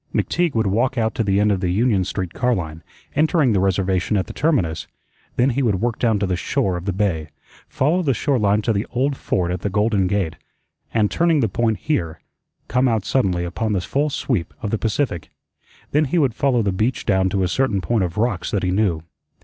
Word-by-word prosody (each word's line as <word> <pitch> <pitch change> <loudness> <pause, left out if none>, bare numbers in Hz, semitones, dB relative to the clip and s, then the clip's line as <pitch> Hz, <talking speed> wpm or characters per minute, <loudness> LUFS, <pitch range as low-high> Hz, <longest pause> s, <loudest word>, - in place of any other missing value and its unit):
McTeague 175 -6 0
would 110 -1 +2
walk 120 +7 +1
out 110 -1 +1
to 115 - -1
the 100 -1 +2
end 105 0 +3
of 95 - +1
the 90 -1 -1
Union 105 +1 +2
Street 90 -1 -4
car 125 -1 +1
line, 80 -4 -5 0.3
entering 150 -4 +3
the 100 - +2
Reservation 95 +1 +1
at 95 - 0
the - - -9
terminus, 110 - 0 0.5
then 130 +2 +3
he 135 +3 0
would 105 -8 +1
work 115 +1 -1
down 115 -3 +2
to 100 - 0
the 90 -1 0
shore 90 +1 -1
of 90 0 -5
the 100 - 0
bay, 90 -6 -1 0.4
follow 160 +7 +1
the 140 -7 +1
shore 135 +3 +1
line 105 0 +2
to 115 - +1
the 100 +2 -2
Old 135 +3 0
Fort 90 -8 -1
at 90 - -2
the 100 - -1
Golden 105 -1 +1
Gate, 90 -5 -1 0.5
and, 105 -2 +1
turning 165 -3 +2
the 115 - +2
Point 110 +2 0
here, 85 - -2 0.5
come 125 +3 +2
out 110 -5 0
suddenly 90 -10 +1
upon 105 +5 -2
the 95 - 0
full 145 +10 0
sweep 120 - -2
of 105 - -2
the 115 - 0
Pacific. 105 - -1 0.6
Then 150 +2 +3
he 150 +6 -1
would 135 -7 +2
follow 125 -2 +1
the 100 - +1
beach 110 +6 -1
down 95 -2 +2
to 95 0 0
a - - +2
certain 110 0 +1
point 110 +1 0
of 85 +1 -4
rocks 105 -6 0
that 100 - -1
he 90 - +1
knew. 90 -5 +1
105 Hz, 225 wpm, -21 LUFS, 95-125 Hz, 0.6 s, end